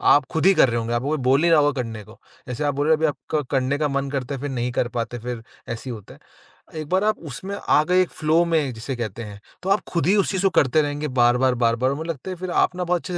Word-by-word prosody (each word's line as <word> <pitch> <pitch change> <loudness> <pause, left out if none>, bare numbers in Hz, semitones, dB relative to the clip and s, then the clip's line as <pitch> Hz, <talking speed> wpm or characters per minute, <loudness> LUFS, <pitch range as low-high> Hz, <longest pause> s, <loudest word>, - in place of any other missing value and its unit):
आप 145 -1 +2
खुद 160 - 0
ही 195 - +7
कर 135 - +5
रहे 120 - -1
होंगे, 115 +1 -3
आपको 120 +3 -1
कोई 155 - 0
बोल 135 +3 +4
नहीं 170 0 +3
रहा 160 - +6
होगा 145 -2 +2
करने 115 -3 -7
को। - - -17 0.3
जैसे 125 +3 -4
आप 145 -1 +1
बोल 145 +1 0
रहे 160 - +5
हो - - -7
अभी 160 - +1
आपका 145 +2 -2 0.2
करने 130 +2 0
का 150 0 +1
मन 140 0 -2
करता 135 0 -3
है 130 - -8
फिर 145 - -3
नहीं 125 -1 -2
कर 120 - 0
पाते 120 +1 -3
फिर 120 -1 -6 0.3
ऐसे 115 +3 -5
ही - - -3
होता 105 -3 -12
है। - - -18 0.6
एक 155 -2 -5
बार 185 +2 +2
आप 215 0 +1
उसमें 190 +9 -6
आ 155 - +2
गए 180 +1 +5
एक 185 - 0
फ्लो 160 +2 +2
में 155 -6 0
जिसे 120 +4 -5
कहते 115 -1 -5
हैं, 105 -1 -9 0.2
तो 190 - -2
आप 200 +2 +4
खुद 170 -3 0
ही 195 - +4
उस 200 - +2
चीज़ 190 -2 -1
को 195 - +5
करते 145 +3 +4
रहेंगे 145 0 -2
बार-बार, 125 +2 +4
बार-बार 120 +2 +1
मुझे 160 +4 -5
लगता 165 +3 -5
है 185 - -4
फिर 185 0 -5
आप 180 - +2
ना 180 - -2
बहुत 175 -1 0
अच्छे 185 - -6
140 Hz, 300 wpm, -23 LUFS, 125-165 Hz, 0.6 s, ही